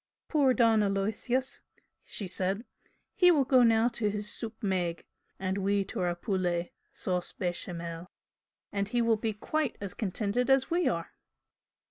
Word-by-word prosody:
"Poor 285 -4 +4
Don 225 -3 +4
Aloysius!" 215 +6 -1 0.4
she 200 - -4
said 190 +5 -1 0.5
"He 360 -4 +5
will 295 -6 +4 0.2
now 225 -1 +4
go 245 - -3
to 220 -3 0
his 210 0 -2
soup 220 -1 -4
maigre 180 -4 -1 0.3
and 190 +1 -2
we 200 0 +1
to - - -5
our 175 -1 0
poulet, 175 -3 -1 0.2
sauce 180 -1 -2
bechamel, 170 -1 -4 0.6
and 200 0 -1
he 240 - 0
will 230 -1 +4
be 220 +1 -1
quite 295 +6 -2
as 200 -2 -5
contented 215 +4 -1
as 270 +2 +3
we 345 0 +2
are!" 170 -1 -2
205 Hz, 150 wpm, -30 LUFS, 185-235 Hz, 0.6 s, He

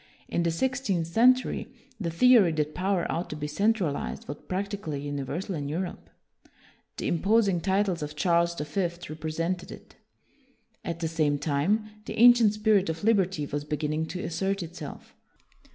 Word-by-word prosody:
In - - -1
the 170 - +1
sixteenth 205 -2 0
century, 245 +9 +2 0.3
the 175 -5 -2
theory 210 +1 +5
that 150 -1 -1
power 185 -1 0
ought 170 +2 -3
to - - -5
be 150 0 -4
centralized 190 -1 -1
was 145 - -5
prac 195 +2 -2
tically 165 -9 -4
universal 145 +7 -4
in 145 -4 -3
Europe. 175 +4 -4 0.9
The - - -2
impos 205 +6 +3
ing 175 -3 0
titles 190 -1 +1
of 150 0 -5
Charles 170 0 +2
the 150 - -4
Fifth 175 +1 -3
represented 165 +4 -3
it. - - -13 0.9
At 170 0 -4
the 165 - 0
same 155 -3 +1
time, 155 +10 0 0.2
the - - -6
ancient 235 -3 +7
spirit 210 -4 +3
of 160 +2 -4
liberty 190 -8 +2
was 145 +1 -3
beginning 150 +1 -2
to 180 - -5
assert 190 +3 -1
itself. 165 -3 -9
170 Hz, 160 wpm, -27 LUFS, 155-200 Hz, 0.9 s, ancient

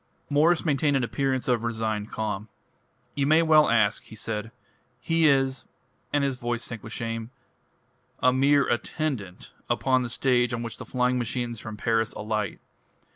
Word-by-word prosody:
Mwres 160 +4 +3
maintained 145 -1 +2
an 130 - 0
appearance 130 +1 -1
of 120 -3 +1
resigned 110 -2 -2
calm. 105 -1 -3 0.6
"You 140 -1 0
may 160 +2 +5
well 155 -2 +5
ask," 110 -3 +3
he 110 - -13
said. 110 +1 -4 0.5
"He 165 -1 +2
is" 135 -2 +2 0.5
and 145 -1 +2
his 135 -2 -1
voice 120 0 -2
sank 115 -3 -6
with 110 - -9
shame 115 0 -4 0.9
"a 125 0 +4
mere 140 +2 +4
attendant 120 - -3 0.2
upon 130 -1 +2
the 125 - -3
stage 125 0 +2
on 115 - -4
which 115 - -6
the - - -8
flying 125 0 +1
machines 120 -1 -3
from 110 -1 -7
Paris 115 0 0
alight. 105 -3 -3
120 Hz, 160 wpm, -26 LUFS, 110-140 Hz, 0.9 s, may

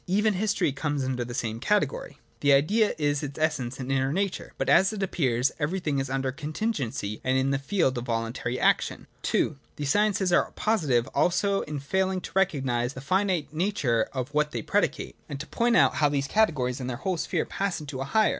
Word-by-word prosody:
Even 210 +4 +2
history 200 -5 +1
comes 145 0 -2
under 130 -1 -1
the 120 - -7
same 115 -3 -2
category. 210 - 0 0.2
The 145 -1 +4
Idea 205 +11 +3
is 145 -2 0
its 140 -2 -6
essence 130 -5 -1
and 130 0 -4
inner 135 0 +1
nature; 195 +3 -2
but, - - -2
as 190 +1 +5
it 205 -2 -3
appears, 130 -9 +1
every 165 +6 -1
thing 150 -6 -1
is 135 0 -2
under 135 0 -1
contingency 145 - -3
and 130 +1 +2
in 135 +1 +1
the 140 - +1
field 135 -4 0
of 120 - -6
voluntary 115 +1 -2
action. - - +1 0.3
(II) 155 - +1 0.2
These 145 -1 -1
sciences 205 -3 +2
are - - +3
positive 150 - +1
also 195 +3 +2
in 150 -1 -5
failing 190 +6 0
to - - -8
recognise 135 -10 +1
the 130 - -8
finite 185 0 0
nature 155 - 0
of 130 +1 -4
what 150 0 +2
they 115 -3 -3
predicate, - - 0
and 140 - -5
to 150 - -5
point 235 +7 +1
out - - +5
how 150 -1 +4
these 140 -1 0
categories 140 - +1
and 130 -1 -4
their 120 - -3
whole 185 +4 -2
sphere - - -1
pass 200 -2 -2
into 140 -3 -6
a - - -2
higher. 215 +10 +3
145 Hz, 205 wpm, -27 LUFS, 130-190 Hz, 0.3 s, as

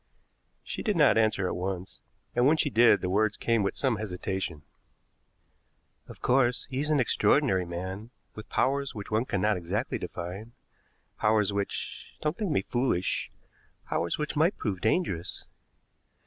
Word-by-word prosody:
She - - -5
did 210 - 0
not 150 -4 +5
answer 110 -3 +2
at - - -2
once, 95 0 -4 0.4
and 120 +2 +4
when 155 +2 +4
she 145 -2 +1
did 115 -3 +5
the 90 - -1
words 105 +1 +2
came 115 -2 +1
with 100 - -1
some 130 -5 +1
hesitation. 95 -6 -4 1.4
"Of - - -13
course, 125 -1 +3
he 130 - -2
is 150 +2 -1
an 150 -2 +3
extraordinary 125 -5 +3
man, 95 +5 -5 0.2
with 110 - -10
powers 140 +1 0
which 105 0 -7
one 110 +3 +1
cannot 105 -2 +1
exactly 95 +8 -2
define, 90 +6 -6 0.7
powers 105 -2 +3
which 100 0 -4
don't 150 0 -1
think 210 -4 -2
me 135 -11 +1
foolish 120 -8 0 0.6
powers 85 0 0
which 150 +1 -3
might 160 +6 +2
prove 95 -6 -3
dangerous. 110 - -1
110 Hz, 150 wpm, -28 LUFS, 95-130 Hz, 1.4 s, not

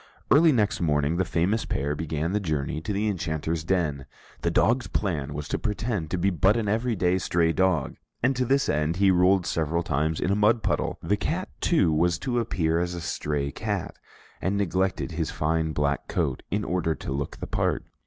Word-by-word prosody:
Early 160 +2 +7
next 105 -9 +1
morning, 75 0 +1
the 95 - +1
famous 95 +7 0
pair 70 +2 -1
began 80 +1 -2
the 105 - +1
journey 75 -4 -2
to 105 - -4
the 105 +2 0
Enchanter's 80 -4 -2
den. 80 -7 -1 0.3
The - - +1
dog's 120 -2 +2
plan 75 -8 -2
was 75 0 -5
to - - -1
pretend 105 -6 -2
to 90 - -1
be 95 +3 +2
but 95 +5 +3
an 110 -3 -1
everyday 105 -5 +1
stray 85 -2 +1
dog, 95 -2 +1 0.3
and 130 +2 +3
to 125 - +1
this 135 +3 +2
end, 75 +3 0
he 95 +1 +4
rolled 90 0 +4
several 80 +1 0
times 80 +1 0
in 95 - 0
a - - +3
mud 105 +2 +3
puddle; - - 0
the 105 - +1
cat, 175 - -2
too, 95 - +3
was 85 +3 +2
to 120 +4 -1
appear 85 -7 0
as 90 0 -2
a - - -4
stray 75 -3 -2
cat, - - -3 0.5
and 95 +5 0
neglected 95 -2 0
his 80 -1 -2
fine 80 +1 0
black 70 -1 -1
coat - - -1
in 105 +1 -1
order 85 -3 0
to - - -6
look 70 0 -4
the - - -5
part. - - -1
90 Hz, 200 wpm, -26 LUFS, 80-105 Hz, 0.5 s, Early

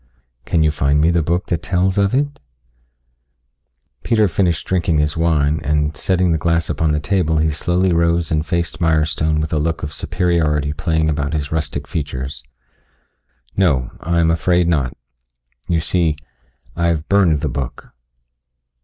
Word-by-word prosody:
Can 80 -2 +1
you 75 - +3
find 70 0 +1
me 80 +3 +3
the 85 -1 +2
book 85 +4 -1
that 85 -2 -2
tells 95 +2 0
of 100 +4 +2
it?" 145 +1 -1 1.6
Peter 110 -3 +2
finished 85 -3 0
drinking 85 -4 +1
his 75 0 0
wine 80 -2 +1
and 75 0 0
setting 90 -2 +1
the 80 - +1
glass 85 +1 0
upon 80 +1 0
the 75 - +1
table, 80 -1 0
he 80 0 +2
slowly 90 +4 +1
rose 85 -1 +1
and 75 -1 +1
faced 85 +1 -2
Mirestone 80 -1 +1
with 80 +1 -3
a 75 - +2
look 80 +2 -2
of 75 -1 -4
superiority 80 -5 0
playing 80 +1 0
about 75 -1 -1
his 75 -1 -3
rustic 75 -2 -3
features. 70 -3 -4 1.1
"No, 70 -11 +1
I 85 +1 0
am 80 -1 +3
afraid 85 +1 +2
not. 70 -7 0 0.7
You 85 -1 +1
see, 80 -1 +1 0.6
I 85 0 +1
have 80 -2 -1
burned 90 -7 +3
the 75 - -1
book." 65 -1 -5
80 Hz, 160 wpm, -19 LUFS, 75-85 Hz, 1.6 s, you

